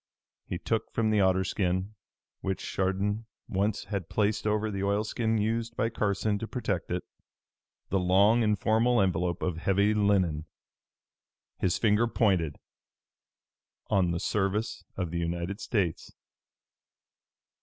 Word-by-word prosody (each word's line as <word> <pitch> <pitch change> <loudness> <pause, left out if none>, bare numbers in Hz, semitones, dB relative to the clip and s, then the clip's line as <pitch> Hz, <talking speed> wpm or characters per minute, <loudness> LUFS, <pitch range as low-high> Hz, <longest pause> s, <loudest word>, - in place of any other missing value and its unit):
He - - -3
took - - -2
from 110 -1 +1
the 105 -1 +3
otter 95 0 +3
skin 95 +2 -1 0.5
which 95 -1 -3
Chardon 100 +3 0 0.2
once 100 +2 0
had 100 -5 -4
placed 105 0 0
over 105 0 +1
the 100 -1 -3
oilskin 110 +3 0
used 115 +2 -1
by 115 - +1
Carson 105 -1 0
to 115 - -4
protect 100 -9 -2
it 90 +1 -2 0.9
the 95 - +2
long 100 +6 +4
and 105 -1 +2
formal 115 +4 +3
envelope 90 -2 0
of 90 -3 -1
heavy 100 +5 +2
linen. 95 -7 +2 1.1
His 90 -2 +1
finger 110 +1 +3
pointed 95 -10 +1 1.4
"On 95 -3 +3
the 85 0 -1
Service 100 +1 -1
of 90 -4 -2
the 85 - -2
United 85 +4 -3
States." 95 -8 -1
100 Hz, 130 wpm, -29 LUFS, 90-110 Hz, 1.4 s, long